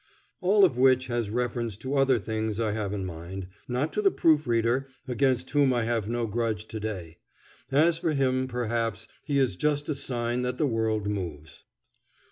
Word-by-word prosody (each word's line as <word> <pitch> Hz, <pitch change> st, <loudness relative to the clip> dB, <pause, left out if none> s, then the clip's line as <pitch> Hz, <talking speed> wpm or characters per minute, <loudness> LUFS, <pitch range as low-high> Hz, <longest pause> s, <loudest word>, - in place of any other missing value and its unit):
All 195 Hz, +2 st, +5 dB
of 130 Hz, -9 st, 0 dB
which 130 Hz, -1 st, +5 dB
has 120 Hz, -3 st, -1 dB
reference 120 Hz, -2 st, -2 dB
to 130 Hz, +5 st, -5 dB
other 135 Hz, -2 st, +4 dB
things 110 Hz, 0 st, -2 dB
I 110 Hz, -2 st, +1 dB
have 105 Hz, -2 st, -2 dB
in 100 Hz, -2 st, -3 dB
mind, 90 Hz, +2 st, -6 dB, 0.2 s
not 125 Hz, +5 st, -1 dB
to -, -, 0 dB
the 400 Hz, -, +5 dB
proof 155 Hz, -, +3 dB
reader, 120 Hz, +3 st, +1 dB, 0.2 s
against 130 Hz, 0 st, +1 dB
whom 140 Hz, -2 st, +4 dB
I 120 Hz, -2 st, +1 dB
have 115 Hz, -2 st, -1 dB
no 120 Hz, 0 st, 0 dB
grudge 110 Hz, -1 st, -2 dB
to 110 Hz, -, -5 dB
day. 90 Hz, -6 st, -5 dB, 0.5 s
As 160 Hz, +4 st, +4 dB
for 165 Hz, -2 st, 0 dB
him, 130 Hz, -2 st, +1 dB
perhaps, 115 Hz, -3 st, -2 dB, 0.2 s
he 145 Hz, -2 st, -1 dB
is 130 Hz, -9 st, +2 dB
just 145 Hz, -, 0 dB
a -, -, +2 dB
sign 120 Hz, -3 st, -2 dB
that 125 Hz, 0 st, -2 dB
the 155 Hz, -, +2 dB
world 110 Hz, -4 st, 0 dB
moves. 85 Hz, -7 st, -5 dB
120 Hz, 185 wpm, -27 LUFS, 110-135 Hz, 0.5 s, All